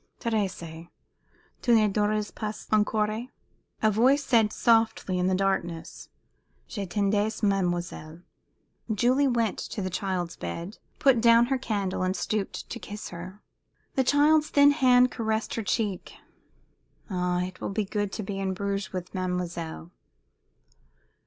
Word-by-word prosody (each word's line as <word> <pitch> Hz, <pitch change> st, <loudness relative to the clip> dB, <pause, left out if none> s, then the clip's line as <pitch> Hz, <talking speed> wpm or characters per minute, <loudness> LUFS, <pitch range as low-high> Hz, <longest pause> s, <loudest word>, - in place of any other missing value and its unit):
"Thérèse! 185 Hz, -7 st, -3 dB, 0.7 s
tu 240 Hz, -2 st, +4 dB
ne 215 Hz, -1 st, +5 dB
dors 210 Hz, +1 st, 0 dB
pas 215 Hz, -1 st, -6 dB
encore?" 215 Hz, +2 st, +1 dB, 0.6 s
A 215 Hz, -, +5 dB
voice 260 Hz, +7 st, +3 dB
said, 225 Hz, -5 st, +3 dB
softly, 225 Hz, -5 st, +2 dB
in 180 Hz, -, +1 dB
the 190 Hz, -, +2 dB
darkness, 185 Hz, -4 st, -2 dB, 0.6 s
"Je 200 Hz, -4 st, -5 dB
t'attendais, 205 Hz, +3 st, 0 dB
mademoiselle." 175 Hz, -4 st, -1 dB, 0.7 s
Julie 250 Hz, +7 st, +3 dB
went 230 Hz, -4 st, 0 dB
to -, -, -5 dB
the 185 Hz, -1 st, -2 dB
child's 180 Hz, -2 st, -2 dB
bed, 170 Hz, -, -6 dB, 0.2 s
put 265 Hz, -4 st, +4 dB
down 235 Hz, 0 st, +6 dB
her -, -, +2 dB
candle, 200 Hz, -6 st, -2 dB
and 185 Hz, +1 st, 0 dB
stooped 200 Hz, +2 st, -3 dB
to -, -, -5 dB
kiss 210 Hz, +1 st, -7 dB
her. 180 Hz, +4 st, -9 dB, 0.5 s
The 265 Hz, -, +2 dB
child's 300 Hz, +3 st, +4 dB
thin 285 Hz, 0 st, +6 dB
hand 255 Hz, -3 st, +4 dB
caressed 220 Hz, -1 st, -2 dB
her 230 Hz, -, -2 dB
cheek. 205 Hz, -2 st, -2 dB, 0.9 s
"Ah, 180 Hz, -1 st, 0 dB
it 185 Hz, 0 st, -7 dB
will -, -, -2 dB
be 205 Hz, +1 st, -1 dB
good 205 Hz, 0 st, -2 dB
to 215 Hz, -, -4 dB
be 195 Hz, 0 st, -4 dB
in 190 Hz, -1 st, -1 dB
Bruges 200 Hz, 0 st, -3 dB
with 180 Hz, -1 st, -6 dB
mademoiselle." 175 Hz, -3 st, -4 dB
205 Hz, 140 wpm, -27 LUFS, 185-225 Hz, 0.9 s, down